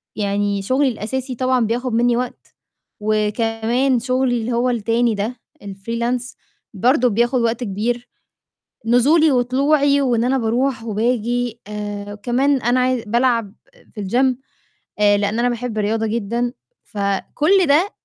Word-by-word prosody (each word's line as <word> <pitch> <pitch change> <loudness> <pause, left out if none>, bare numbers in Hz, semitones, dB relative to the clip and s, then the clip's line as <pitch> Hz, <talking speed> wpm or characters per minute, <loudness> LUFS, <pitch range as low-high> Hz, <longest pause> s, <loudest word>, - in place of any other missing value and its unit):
يعني 200 -1 -1
شُغلي 260 +7 +1
الأساسي 255 +3 -4
طبعًا 255 -1 +1
بياخُد 240 +2 -2
منّي 240 +1 +2
وقت 250 -1 -6 0.4
وكمان 225 +4 0
شُغلي 255 0 0
اللي 235 - -3
هو 245 +2 +1
التاني 230 0 +1
ده، 215 +5 -3 0.3
الfreelance 235 +6 -3 0.4
برضه 250 +5 +3
بياخُد 240 +3 +1
وقت 235 +1 0
كبير، 235 +4 -2 0.8
نزولي 290 +7 +4
وطلوعي 280 +3 +2
وإن 240 -4 +1
أنا 260 +2 +1
باروح 240 +1 0
وباجي 235 +1 -1
آآ 205 -1 -5
وكمان 250 +6 0
أنا 240 +2 +2
عاي 255 -2 +1
بالعب 235 -2 +1 0.4
في 210 - -5
الgym، 255 +5 +2 0.6
آآ 205 -1 +4
لإن 205 +2 -1
أنا 245 - +2
باحب 240 -2 -3
الرياضة 220 +2 0
جدًا. 235 +2 -2 0.3
فكل 260 - +1
ده 320 +8 +3
240 Hz, 130 wpm, -20 LUFS, 215-255 Hz, 0.8 s, نزولي